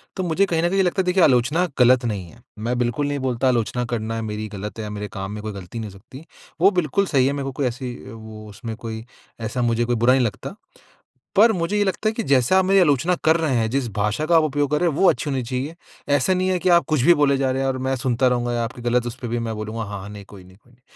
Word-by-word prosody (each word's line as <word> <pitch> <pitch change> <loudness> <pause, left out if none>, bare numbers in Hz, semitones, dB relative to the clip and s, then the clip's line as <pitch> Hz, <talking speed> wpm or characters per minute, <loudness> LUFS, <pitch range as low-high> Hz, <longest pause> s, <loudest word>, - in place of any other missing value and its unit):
तो 185 - -2
मुझे 180 +3 +2
कहीं 165 -3 0
न 175 - +2
कहीं 195 0 +2
लगता 180 +2 +1
है - - -2
देखिए, 180 0 +3
आलोचना 140 +7 +3
गलत 125 0 +5
नहीं 100 -6 -3
है। - - -18 0.2
मैं 120 +3 -2
बिल्कुल 120 +4 0
नहीं 145 -1 -2
बोलता 130 0 0
आलोचना 125 0 0
करना 115 -1 -2
है 115 - -3
मेरी 110 0 -4
गलत 105 +1 -7
है 110 - -3
या 105 - -5
मेरे 105 0 -5
काम 95 0 -5
में 105 - -6
कोई 110 -1 -5
गलती 100 +3 -8
नहीं 110 -2 -6
हो 95 - -14
सकती। 130 +10 -13 0.4
वो 195 +2 +6
बिल्कुल 180 +2 +1
सही 135 -8 +2
है। 140 - 0
मेरे 140 - -3
को 135 - -4
कोई 135 +1 -2
ऐसी 125 0 -5
अ, - - -10
वो 110 -1 -10
उसमें 110 +2 -7
कोई 110 0 -7 0.4
ऐसा 115 +3 -3
मुझे 120 0 +1
कोई 120 0 0
बुरा 120 +3 +4
नहीं 130 -2 +3
लगता। 105 -4 -5 0.8
पर 225 +4 +6
मुझे 180 +2 -1
ये 205 - +3
लगता 200 +3 0
है - - -4
कि 225 0 -3
जैसा 135 +7 +4
आप 190 - +2
मेरी 195 +1 +4
आलोचना 165 +1 +3
कर 160 +1 +4
रहे 160 -4 0
हैं, 110 -1 0
जिस 135 -1 -1
भाषा 105 +8 0
का 165 +1 +4
उपयोग 145 -2 0
कर 150 - +2
रहे 175 - +3
हैं 145 - -3
वो 195 - +5
अच्छी 150 - -1
होनी 135 -2 -1
चाहिए। 130 +6 -4 0.4
ऐसा 145 +7 +2
नहीं 185 +1 0
है 185 - +1
कि 185 - 0
आप 170 - -1
कुछ 155 -5 +1
भी 175 +8 +6
बोले 140 -3 +2
जा 135 -1 0
रहे 130 +1 -1
हैं, 135 - 0
और 130 - -2
मैं 130 +1 -1
सुनता 125 0 +1
रहूँगा 120 -1 0
या 120 -1 0
आपकी 120 +1 -6
ग़लत 120 0 +1
उसपे 120 +1 -6
भी 120 +1 -2
मैं 110 - -3
बोलूँगा 110 +1 -4
हाँ-हाँ 100 -1 -7
नहीं 105 -1 -10
कोई 100 -3 -13
नहीं, 95 +1 -18
कोई 120 +3 -27
नहीं। 120 - -27
125 Hz, 290 wpm, -22 LUFS, 115-155 Hz, 0.8 s, वो